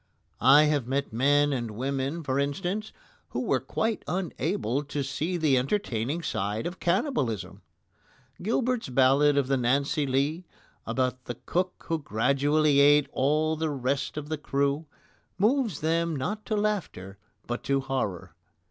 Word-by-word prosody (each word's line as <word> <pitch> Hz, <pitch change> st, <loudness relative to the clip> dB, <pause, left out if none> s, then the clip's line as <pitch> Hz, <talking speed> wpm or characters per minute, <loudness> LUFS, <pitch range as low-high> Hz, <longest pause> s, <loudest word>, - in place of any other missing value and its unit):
I 140 Hz, +3 st, +7 dB
have 150 Hz, -5 st, +1 dB
met 135 Hz, -2 st, -2 dB
men 145 Hz, +4 st, +3 dB
and 120 Hz, -3 st, -2 dB
women, 135 Hz, +7 st, -3 dB
for 135 Hz, -1 st, 0 dB
instance, 180 Hz, +9 st, -2 dB, 0.4 s
who -, -, -3 dB
were -, -, +1 dB
quite 225 Hz, -1 st, -2 dB
unable 165 Hz, -, -1 dB
to 145 Hz, 0 st, -3 dB
see 155 Hz, +6 st, -2 dB
the 150 Hz, -6 st, +3 dB
entertaining 140 Hz, -, -1 dB
side 105 Hz, -1 st, -2 dB
of 175 Hz, +2 st, -5 dB
cannibalism. 175 Hz, -, -1 dB, 0.8 s
Gilbert's 235 Hz, -, 0 dB
ballad 135 Hz, +3 st, +4 dB
of 140 Hz, -2 st, +2 dB
the 135 Hz, 0 st, +2 dB
Nancy 140 Hz, +4 st, +1 dB
Lee, 145 Hz, +7 st, 0 dB, 0.4 s
about 130 Hz, +2 st, -1 dB
the 120 Hz, -, -5 dB
cook 180 Hz, +1 st, -2 dB
who 165 Hz, -1 st, 0 dB
gradually 140 Hz, +5 st, +2 dB
ate 145 Hz, 0 st, +5 dB
all 155 Hz, +4 st, +1 dB
the 160 Hz, 0 st, -1 dB
rest 135 Hz, +1 st, -2 dB
of 150 Hz, -1 st, -4 dB
the 155 Hz, -1 st, -3 dB
crew, 140 Hz, +2 st, -1 dB, 0.5 s
moves 225 Hz, +1 st, +1 dB
them 165 Hz, +1 st, +1 dB
not 210 Hz, +11 st, -4 dB
to 215 Hz, -, 0 dB
laughter 190 Hz, -, -2 dB, 0.3 s
but 120 Hz, 0 st, -3 dB
to 140 Hz, 0 st, +1 dB
horror. 100 Hz, -10 st, -3 dB
145 Hz, 145 wpm, -27 LUFS, 130-170 Hz, 0.8 s, I